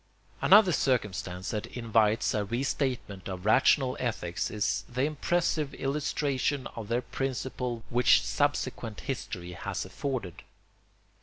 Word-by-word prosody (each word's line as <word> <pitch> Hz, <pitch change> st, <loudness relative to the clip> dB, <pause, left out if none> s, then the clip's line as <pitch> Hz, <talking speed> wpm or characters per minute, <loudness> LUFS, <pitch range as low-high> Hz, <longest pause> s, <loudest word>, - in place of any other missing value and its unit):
Another 200 Hz, -2 st, +7 dB
circumstance 100 Hz, -, -1 dB
that 105 Hz, -2 st, -3 dB
invites 115 Hz, -2 st, +1 dB
a 105 Hz, -2 st, +1 dB
restatement 120 Hz, -, -2 dB
of 95 Hz, 0 st, -6 dB
rational 130 Hz, +3 st, +4 dB
ethics 95 Hz, -8 st, -2 dB
is 105 Hz, -2 st, -1 dB
the 125 Hz, +1 st, -1 dB
impressive 155 Hz, 0 st, 0 dB
illustration 140 Hz, -1 st, -1 dB
of 115 Hz, -3 st, -6 dB
their 120 Hz, +3 st, 0 dB
principle 125 Hz, -1 st, -3 dB
which 125 Hz, +1 st, +5 dB
subsequent 130 Hz, -6 st, -1 dB
history 100 Hz, -9 st, -5 dB
has 85 Hz, -, -4 dB
afforded. 125 Hz, -11 st, -4 dB
125 Hz, 110 wpm, -29 LUFS, 105-135 Hz, -, Another